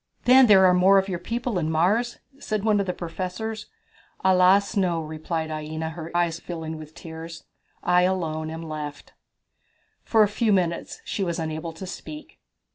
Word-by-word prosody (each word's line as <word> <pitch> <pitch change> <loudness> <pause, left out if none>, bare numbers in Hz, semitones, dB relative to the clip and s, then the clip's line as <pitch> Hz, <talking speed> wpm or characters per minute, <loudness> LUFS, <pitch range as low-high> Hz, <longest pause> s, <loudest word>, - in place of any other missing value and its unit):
"Then 255 +1 +7
there 195 -3 +7
are 180 - +6
more 185 +2 +5
of 195 0 +2
your 180 -3 -3
people 230 +2 -2
in 155 -2 -1
Mars?" 200 +10 +1 0.2
said 215 -2 -3
one 215 -2 +3
of 200 - -1
the - - +1
professors. 185 +5 -5 0.6
"Alas, 190 +3 +4
no," 180 -4 +1
replied 160 +1 -4
Aina, 155 +1 -4
her 165 0 -7
eyes 170 -1 0
filling 160 -2 -6
with 155 +1 -11
tears, 165 0 -9 0.4
"I 180 0 +4
alone 165 -4 -1
am 165 +1 -6
left." 150 -2 -7 0.9
For 220 -2 +4
a - - +3
few 215 +2 0
minutes 175 -4 -1
she 200 - -2
was 170 -2 -2
unable 160 +1 -4
to 165 +4 -8
speak. 300 +11 -9
175 Hz, 170 wpm, -25 LUFS, 160-195 Hz, 0.9 s, Then